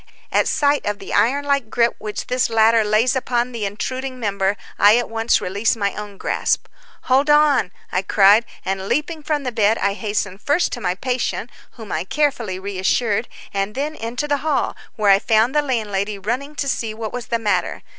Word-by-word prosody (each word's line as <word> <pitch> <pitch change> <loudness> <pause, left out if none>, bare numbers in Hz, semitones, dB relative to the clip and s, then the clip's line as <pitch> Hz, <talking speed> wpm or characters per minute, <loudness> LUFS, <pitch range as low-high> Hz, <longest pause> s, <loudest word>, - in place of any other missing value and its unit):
At - - +2
sight 290 -1 +2
of 205 0 -1
the - - -8
iron 280 +5 +2
like 280 -5 0
grip 235 +1 +2
which 210 -1 -5
this 250 -1 0
latter 225 0 +4
lays 215 +5 +2
upon 250 -1 0
the 230 -4 -3
intruding 255 +6 -4
member, 200 -2 0 0.2
I 205 +3 +7
at 240 -2 -2
once 225 +1 +2
release 200 +6 0
my 200 -3 -1
own 205 -1 -8
grasp. - - 0 0.4
"Hold 270 +3 +2
on," 295 -9 +4 0.2
I 185 - +1
cried, 200 +3 +5 0.2
and 190 0 -2
leaping 310 - -1
from 295 -1 -1
the 250 - -2
bed, 220 -1 +2
I 200 0 0
hastened 205 -2 -3
first 310 +5 +1
to 240 - -5
my 180 -3 0
patient, 245 0 -2 0.2
whom 220 -6 -10
I - - -1
carefully 240 -5 -1
reassured, 200 +4 0 0.3
and 195 +1 -2
then 290 +3 -2
into 245 +2 -4
the 290 -1 +1
hall, 295 0 -1 0.2
where 210 -2 +3
I 195 - +6
found 225 +3 +2
the 300 - +3
landlady 210 -6 -2
running 250 +9 -3
to 280 - -2
see 225 -5 -2
what 220 -1 -5
was 245 -2 -5
the 235 - 0
matter. 205 -5 -1
225 Hz, 195 wpm, -20 LUFS, 205-260 Hz, 0.4 s, I